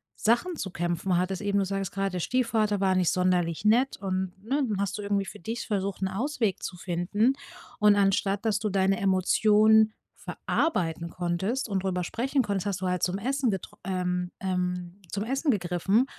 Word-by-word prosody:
Sachen 240 +11 +1
zu 195 - -4
kämpfen 175 +1 -1
hattest 185 +2 -1
eben. 200 -1 0
Du 200 - +2
sagtest 195 -1 -3
grad: 195 -1 -1
„Der 180 - -2
Stiefvater 220 -1 +1
war 190 -1 +2
nicht 180 -2 +3
sonderlich 180 -2 +1
nett“, 245 +5 +3
und, 190 -1 -2
ne, 275 +6 0
dann 205 -2 -1
hast 200 +1 -2
du - - -3
irgendwie 200 -1 0
für 190 - -9
dich 225 +7 -4
versucht, 195 -2 -2
'n - - +2
Ausweg 225 +1 -1
zu 180 - -5
finden. 190 +8 +1 0.5
Und 210 -1 +6
anstatt 200 +1 +1
dass 215 -2 +2
du 215 -1 -1
deine 195 -1 +2
Emotionen 215 +3 +4 0.3
verarbeiten 170 - -1
konntest 180 +10 -2
und 195 -3 -1
drüber 180 -2 -1
sprechen 260 +8 0
konntest, 200 -1 -2
hast 190 -2 -2
du 185 - -1
halt 180 -1 -1
zum 180 +1 0
Essen 260 +4 0
getr 195 -3 -4
ähm, 180 -1 -1
ähm, 180 0 -3
zum 200 - -2
Essen 270 +6 -1
gegriffen. 195 +3 +2
195 Hz, 185 wpm, -27 LUFS, 180-215 Hz, 0.5 s, Und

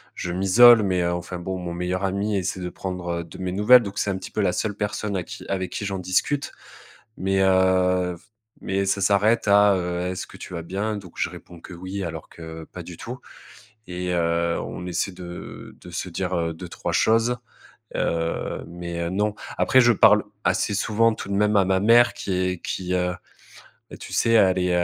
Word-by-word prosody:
je 90 - -4
m'isole. 110 +5 +7
Mais 90 -3 +1
enfin 85 +1 -3
bon, 95 +2 -4
mon 90 -1 -5
meilleur 90 +2 -2
ami 100 +2 -1
essaie 95 0 -2
de 90 - -3
prendre 90 -2 -4
de 80 - -12
mes 95 -1 -3
nouvelles. 105 +6 +6
Donc, 100 -2 -7
c'est 100 - 0
un 95 - -2
petit - - -9
peu 105 - -1
la 90 -3 +1
seule 105 -2 -2
personne 105 -1 -2
à 90 - -2
qui - - -10
avec 95 -2 -2
qui 105 - -4
j'en 100 -1 -3
discute. 95 +11 0 0.7
Mais, 95 +1 0
heu, 95 -1 +3 0.5
mais 95 +1 -1
ça 100 +1 0
s'arrête 105 +4 +3
à, 100 0 +6
heu: 90 -1 -2
«Est-ce 95 - -5
que - - -14
tu - - -9
vas 85 - -4
bien?» 100 +5 -3
Donc, 95 -4 -11
je - - 0
réponds 85 -2 -12
que 95 - -11
oui, 95 +3 -5
alors 80 -3 -6
que 80 -1 -9
pas - - -9
du - - -10
tout. - - -7 0.7
Et 90 0 -3
heu, 85 0 +1
on 90 - -6
essaie 90 +2 -1
de 90 -1 -9
de - - -11
se 90 +1 -4
dire, 90 +1 -2
heu, 85 -1 -1
2-3 85 +2 -6
choses, 115 +2 +3 0.6
heu, 85 0 -2
mais 85 0 -4
non. 105 +3 0 0.2
Après, 130 - +5
je 120 -1 +6
parle, 105 -1 +6 0.2
assez 105 - +1
souvent, 115 +2 +2
tout - - -8
de 100 - -2
même, 105 +1 +2
à 100 - +5
ma 95 0 +1
mère 120 +3 +5
qui 95 - -4
est 90 -1 -1
qui, 90 -1 -3
heu, 90 0 0 0.9
tu - - -9
sais, - - +2
elle 95 -5 +5
est 90 0 +1
95 Hz, 200 wpm, -24 LUFS, 90-100 Hz, 0.9 s, m'isole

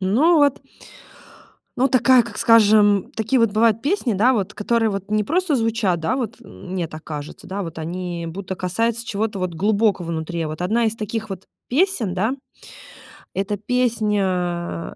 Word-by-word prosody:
Ну, 260 - +3
вот 285 -2 +2 1.1
ну 265 +2 +3
такая, 255 0 +5
как 235 - -9
скажем, 210 -3 +5
такие 225 +4 +1
вот 230 -3 +3
бывают 225 0 +2
песни, 290 - 0
да 220 +6 +3
вот, 210 -4 -2
которые 225 +1 +1
вот 195 0 -5
не 215 0 +2
просто 340 - 0
звучат, 225 -7 0
да, 160 +9 0
вот 235 -4 -3
м 200 -4 -13
мне 180 -3 -2
так 155 +1 -10
кажется, 150 -2 -8
да, 200 +2 -4
вот 165 -3 -7
они 170 +1 -4
будто 190 +3 -6
касаются 225 +6 -1
чего-то 210 -1 -2
вот 185 -2 -3
глубокого 200 0 +1
внутри. 165 +1 -3
А 160 - -3
вот 155 +1 -7
1 225 +6 +1
из 220 0 -2
таких 220 0 -4
вот 190 -1 -6 0.2
песен, 270 - +1
да, 215 +6 0 1.0
это 200 +1 -2
песня, 200 -8 -1
210 Hz, 170 wpm, -21 LUFS, 185-230 Hz, 1.1 s, такая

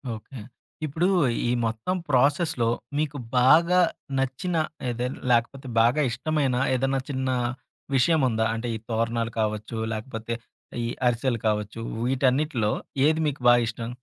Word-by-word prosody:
Okay. 115 +4 -10 0.5
ఇప్పుడు 160 +5 0 0.4
ఈ - - +1 0.2
మొత్తం 115 +11 -2
ప్రాసెస్‌లో 140 -1 +2 0.3
మీకు 150 -1 -1 0.2
బాగా 170 +8 +5 0.4
నచ్చిన 135 +7 -1 0.3
ఏదే 120 +1 -2 0.2
లేకపోతే 120 +3 +1
బాగా 120 +6 +3
ఇష్టమైన 140 +1 0 0.2
ఏదైనా 135 +1 +1
చిన్న 130 -1 -1 0.7
విషయముందా? 130 -6 +3
అంటే 115 +1 -3
ఈ - - -2
తోరణాలు 115 0 0
కావచ్చు, 110 +1 -2 0.2
లేకపోతే 110 0 -5 0.5
ఈ 115 - -1 0.2
అరిసెలు 120 0 0
కావచ్చు 105 +1 -1 0.3
వీటన్నిటిలో 130 -2 +1 0.3
ఏది 155 +1 +3
మీకు 145 -2 -3
బా 120 - +9
ఇష్టం? 115 +1 -5
125 Hz, 120 wpm, -25 LUFS, 115-145 Hz, 0.7 s, బా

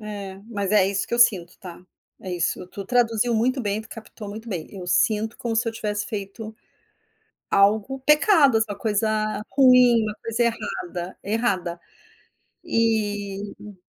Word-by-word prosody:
É, 205 -2 -7
mas 205 -3 -3
é 205 -3 +5
isso 195 0 -1
que 235 - -1
eu - - -2
sinto, 195 -8 +3
tá? 180 -2 -11 0.4
É 185 - -7
isso, 175 +1 -2
tu 200 +1 -8
traduziu 235 0 +1
muito 255 +4 +1
bem, 205 0 -1
tu 220 - -13
captou 220 -2 -10
muito 220 +3 -8
bem, 175 -6 -4
eu 185 -3 -8
sinto 215 +4 +1
como 230 -2 -2
se 230 - +1
eu 230 - -1
tivesse 210 -2 -3
feito 215 +1 -6 1.0
algo 215 +6 +2
pecado, 300 - +5
só 215 -2 -2
coisa 215 0 -1
ruim, 250 -3 +6
uma 215 - -3
coisa 230 +1 -1
errada 190 -6 -4
errada 195 -5 -1 0.8
e 205 -3 -2
215 Hz, 150 wpm, -23 LUFS, 200-230 Hz, 1.0 s, ruim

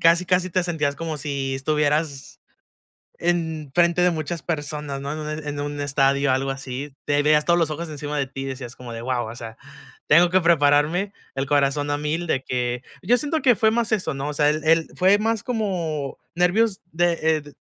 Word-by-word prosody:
casi, 170 +2 +5
casi 180 +1 +1
te 185 +1 +1
sentías 155 -5 -1
como 160 -1 -4
si 135 -2 -2
estuvieras 150 0 -1 0.8
en 160 -4 -1
frente 175 0 +3
de 180 - +5
muchas 160 0 -4
personas, 145 -3 -4
¿no?, 140 +1 -4
en 155 - -4
un 155 0 -5
e - - -3
en 145 0 -3
un 145 0 -4
estadio, 140 -1 +2
algo 135 +1 0
así, 135 +1 -6
te 145 0 +2
veías 150 0 +4
todos 170 0 +3
los 160 -2 +1
ojos 165 +2 -4
encima 150 -1 -4
de 140 - 0
ti 135 +1 -8
y - - -4
decías 125 -2 -6
como 125 -2 -9
de 115 - -6
wao, 125 -1 -1
o 115 - -9
sea, 115 -2 -8 0.5
tengo 170 +4 +6
que 185 +1 +4
prepararme, 165 +4 +3 0.2
el 135 0 -1
corazón 145 0 +1
a 145 - 0
1000, 155 +4 -2
de 135 -5 0
que 125 -1 -2 0.2
Yo 245 - +4
siento 305 +3 0
que 250 -4 +5
fue 220 +2 +3
más 230 -1 0
eso, 185 -8 0
¿no? 135 +2 -3
O - - -6
sea, 145 0 +3
él 155 0 -2
él, 165 0 +3
fue 190 +3 +4
más 225 0 -1
como, 175 - -2 0.2
nervios 190 +4 +2
de, 175 +1 +2
eh, 160 -1 +2
d 145 - -14
150 Hz, 215 wpm, -23 LUFS, 140-175 Hz, 0.8 s, tengo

